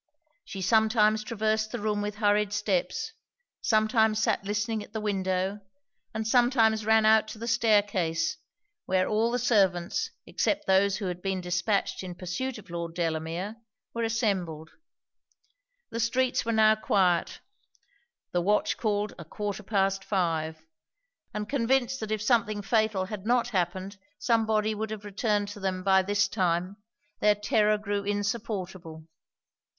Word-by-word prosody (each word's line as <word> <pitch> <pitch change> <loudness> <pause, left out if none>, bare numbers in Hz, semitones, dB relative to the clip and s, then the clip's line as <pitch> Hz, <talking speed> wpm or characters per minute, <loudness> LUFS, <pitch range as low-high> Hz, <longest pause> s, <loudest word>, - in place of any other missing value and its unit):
She 195 -1 -6
sometimes 220 +1 +3
traversed 220 0 -1
the - - -3
room 210 0 -1
with 205 0 -3
hurried 205 -1 +2
steps; 205 -3 -1 0.5
sometimes 215 0 +3
sat 210 - +1
listening 210 +2 -1
at 205 - -12
the 220 - -2
window; 190 -1 -1 0.5
and 220 0 -3
sometimes 225 -3 +3
ran 220 0 +5
out 220 0 +5
to 220 - -8
the 230 +2 -6
stair 225 -3 +4
case, 175 - -1 0.5
where 185 0 +2
all 220 +2 +1
the 245 - 0
servants 205 - +1 0.2
except 305 0 -1
those 190 0 +3
who 210 - -5
had 180 -1 -4
been 190 0 -1
dispatched 180 +3 -1
in 180 -2 -7
pursuit 185 +9 -4
of 200 -4 -13
Lord 170 -1 -5
Delamere 170 +5 -3 0.4
were 235 - -3
assembled. 195 -9 -1 1.2
The 230 - -3
streets 250 +3 +1
were 230 - -1
now 220 -1 +5
quiet; 185 -5 +1 0.9
the 175 - +1
watch 205 +4 +1
called 210 -2 -1
a - - -6
quarter 205 +5 -5
past 195 -1 0
five; 160 -5 -1 0.7
and 210 0 -4
convinced 265 +1 +1
that 220 - -5
if 215 -1 -1
something 215 -3 +1
fatal 215 -3 +1
had 205 +1 -7
not 245 0 +2
happened 190 0 -2 0.2
some 225 -2 +1
body 215 0 +1
would 215 +1 -4
have 215 -1 -6
returned 205 0 -1
to 205 - -8
them 185 -1 -2
by 190 0 +5
this 205 +1 +1
time, 180 0 -1 0.4
their 210 0 +4
terror 210 +1 +2
grew 205 -1 -2
insupportable. 200 -6 -4
210 Hz, 150 wpm, -28 LUFS, 190-220 Hz, 1.2 s, ran